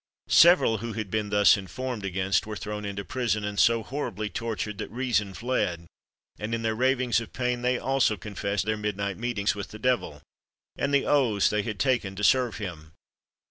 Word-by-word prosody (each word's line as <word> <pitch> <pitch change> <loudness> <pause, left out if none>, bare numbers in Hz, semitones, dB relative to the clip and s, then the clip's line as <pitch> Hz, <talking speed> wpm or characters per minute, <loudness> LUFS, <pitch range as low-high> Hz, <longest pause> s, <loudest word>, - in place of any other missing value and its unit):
Several 170 - +6
who 115 +1 -5
had 110 -4 -5
been 110 -1 -1
thus 105 0 +6
informed 120 +3 -5
against 95 +1 0
were 105 - -5
thrown 105 0 -5
into 100 0 -5
prison, 115 -5 -1
and 105 -1 -3
so 115 -1 +4
horribly 110 -5 -4
tortured, 110 0 -4
that - - -4
reason 115 -6 -1
fled, 90 -9 -1 0.5
and 110 +2 -2
in 115 - -4
their 110 0 +1
ravings 125 0 +1
of 115 - -10
pain 125 -1 -1
they 125 0 +1
also 130 -6 +1
confessed 100 -1 -3
their 110 0 0
midnight 100 -1 -3
meetings 115 -4 0
with 100 -1 -6
the 110 - -10
devil, 110 - -1 0.5
and 140 - -1
the 140 -1 +3
oaths 120 -9 +3
they 105 - +1
had 105 0 -5
taken 120 -6 0
to 105 - -5
serve 125 0 +3
him. 80 -7 -7
110 Hz, 185 wpm, -27 LUFS, 100-125 Hz, 0.5 s, Several